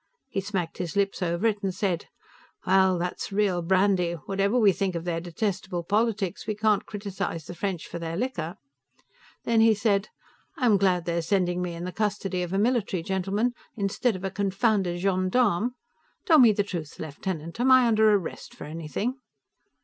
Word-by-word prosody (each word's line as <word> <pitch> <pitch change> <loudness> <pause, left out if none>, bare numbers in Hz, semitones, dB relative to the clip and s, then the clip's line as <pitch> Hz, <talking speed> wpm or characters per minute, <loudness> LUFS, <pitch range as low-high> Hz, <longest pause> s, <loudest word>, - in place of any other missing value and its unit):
He 195 - -2
smacked 190 -4 -3
his 175 -3 -4
lips 200 0 0
over 170 +3 -1
it 210 -2 +1
and 195 -2 -1
said, 185 -4 -1 0.6
"Well, 190 -1 +4
that's 180 +3 -3
real 195 -3 +1
brandy; 185 0 +2
whatever 195 +7 -1
we 210 -5 +6
think 190 0 -2
of 170 0 -4
their 165 -1 -1
detestable 180 0 -3
politics, 210 0 0
we 215 - -1
can't 210 -1 +1
criticize 195 -6 -4
the - - -7
French 180 -1 -3
for 170 - -7
their 165 0 -4
liquor." 180 -8 -3 0.9
Then, 230 -1 +3
he 225 -1 +5
said, 205 -1 +1 0.5
"I'm 235 -6 +4
glad 180 -3 +2
they're 170 0 0
sending 180 0 0
me 175 -1 -3
in 170 - -6
the 180 - -4
custody 200 -3 -1
of 175 -1 -3
a 195 - 0
military 210 -5 +1
gentleman, 195 +6 0 0.2
instead 210 +2 0
of 185 - -7
a 195 - -2
confounded 195 -2 +1
gendarme. 195 +4 +1 0.5
Tell 325 -7 +6
me 240 -4 +8
the 205 0 +1
truth, 170 -7 -6
lieutenant; 165 +4 -5
am 255 +2 +3
I 255 -1 +7
under 220 -2 +4
arrest 200 -5 -2
for - - -9
anything?" 165 - -4
195 Hz, 175 wpm, -26 LUFS, 175-210 Hz, 0.9 s, me